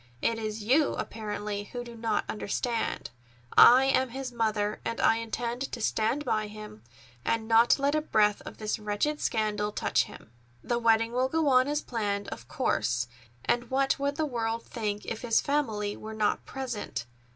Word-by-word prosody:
It 230 - 0
is 215 -1 -4
you, 275 +7 +3
apparently, 210 -1 -4
who 245 +4 -6
do 240 -1 -10
not 225 -2 -1
understand. 225 +2 -2 0.4
I 255 +2 +9
am 260 -1 +2
his 260 +1 -5
mother, 215 -3 -1
and 230 - -3
I 225 - +4
intend 235 +3 -3
to 240 - -5
stand 230 +6 0
by 215 0 0
him, 210 - -10 0.4
and 225 -1 0
not 230 +1 +5
let 280 +1 +1
a 310 - +2
breath 210 -8 +2
of - - -9
this 215 +1 -2
wretched 210 +9 -1
scandal 210 -2 0
touch - - +1
him. - - -13 0.3
The 240 - 0
wedding 230 0 +3
will 255 +2 +1
go 320 -1 +2
on 255 0 +5
as 295 +1 -1
planned, 205 -4 -2
of 120 - -8
course, 120 +2 0 0.4
and 240 0 0
what 270 +1 +1
would 280 +1 0
the 315 - 0
world 230 -4 -2
think 210 -3 -3
if 225 - -4
his 230 -2 +3
family 220 -8 -1
were 220 0 -8
not 210 -1 0
present? 235 - -4
225 Hz, 175 wpm, -28 LUFS, 210-255 Hz, 0.4 s, I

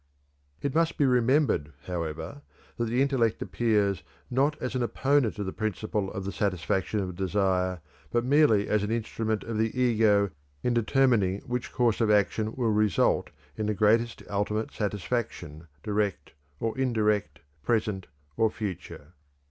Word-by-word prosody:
It 140 -2 -1
must 165 0 +1
be 145 - +3
remembered, 125 - +2
however, 85 - -4 0.4
that 120 - 0
the 120 +4 +2
intellect 125 -6 +1
appears 105 -5 +1 0.3
not 140 +4 +1
as 125 - -3
an 130 - -1
opponent 130 -1 +1
of 105 - -3
the 95 - -4
principle 105 -1 -2
of 95 -2 -5
the 100 - -2
satisfaction 95 +1 -1
of 90 -2 -4
desire, 95 -1 0 0.3
but 120 0 0
merely 130 -7 +4
as 105 - +2
an 105 - -2
instrument 110 -1 -2
of 115 -1 -3
the 110 +3 0
ego 110 -5 +3 0.3
in 125 - +1
determining 115 -5 +2
which 125 0 -4
course 120 -2 +1
of 110 - +3
action 105 +1 +2
will 120 -4 +1
result 105 -1 +2 0.3
in 110 -1 -2
the 105 - 0
greatest 115 +3 +2
ultimate 105 +2 -1
satisfaction, 100 -6 -3 0.2
direct 105 -2 -1 0.3
or 115 -1 -2
indirect, 105 - 0 0.2
present 105 -3 -1 0.3
or 110 - +3
future. 90 -7 -7
110 Hz, 150 wpm, -27 LUFS, 100-120 Hz, 0.4 s, merely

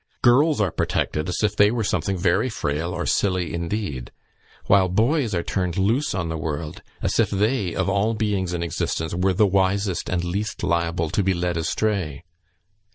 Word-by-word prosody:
Girls 140 +5 +4
are 100 -5 +1
protected 75 +1 -1
as 90 - -2
if 105 -1 +1
they 105 0 +5
were 115 0 -1
something 100 -2 -1
very 90 +7 +2
frail 85 -5 -2
or - - -3
silly 90 -4 0
indeed, 85 - -3 0.6
while 95 -2 +4
boys 115 - +1
are 85 - -1
turned 90 -3 -2
loose 115 +10 +1
on 90 -3 -2
the 80 -1 -3
world, 75 0 -4 0.2
as - - 0
if - - +3
they, 105 -2 0
of 95 - 0
all 100 +3 +1
beings 100 -4 -1
in 85 -1 -2
existence, 80 -1 -2
were 90 +2 +1
the 105 +4 +4
wisest 95 0 +1
and 90 -1 0
least 100 +4 -3
liable 85 -2 0
to - - +1
be 95 -1 +1
led 90 0 -1
astray. 85 -3 -1
95 Hz, 180 wpm, -23 LUFS, 85-105 Hz, 0.6 s, they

